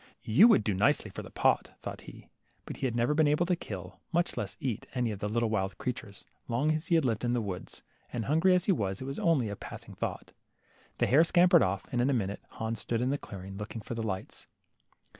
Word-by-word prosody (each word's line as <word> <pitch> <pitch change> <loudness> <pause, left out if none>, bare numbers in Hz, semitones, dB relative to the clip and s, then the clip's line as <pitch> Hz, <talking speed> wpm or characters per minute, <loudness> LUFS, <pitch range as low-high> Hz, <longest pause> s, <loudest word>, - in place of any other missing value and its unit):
You 150 - +7
would 225 - +5
do 105 - 0
nicely 105 +2 +2
for - - -6
the - - -10
pot,'' - - +2
thought - - -7
he, - - -12 0.4
but - - -7
he 135 - 0
had 120 - -3
never 120 +5 +2
been 155 0 +4
able 150 +4 +3
to 180 0 +2
kill, 95 - -8
much 175 +1 +1
less - - -4
to 150 - -10
eat, 120 -6 -2
any 120 -3 0
of 100 - -6
the 105 - -2
little 115 0 0
wild 95 -4 -1
creatures, - - -5 0.2
long 130 +7 +1
as 155 +2 -3
he 175 - +3
had 160 -4 +3
lived 115 -3 0
in 120 0 +1
the 120 - +2
wood; 95 -4 -5 0.4
and 115 -3 -3
hungry 165 +6 +4
as 180 - +1
he - - +3
was, 100 - -1
it 130 - -6
was 135 +1 -4
only 155 -9 +2
a 100 - -4
passing - - -9
thought. - - -5 0.7
The - - +2
hare 145 +6 +6
scampered 175 -1 +5
off, 100 -3 0
and 120 - +1
in 130 - +2
a - - +2
minute 100 -5 -2
more - - -18
Hans 110 0 -2
stood 115 +1 -1
in 125 +2 +1
the 145 - -1
clearing, 95 0 -8
looking 105 +2 -6
for - - -5
the 115 - -3
lights. 105 -4 -5
120 Hz, 255 wpm, -30 LUFS, 105-150 Hz, 0.7 s, You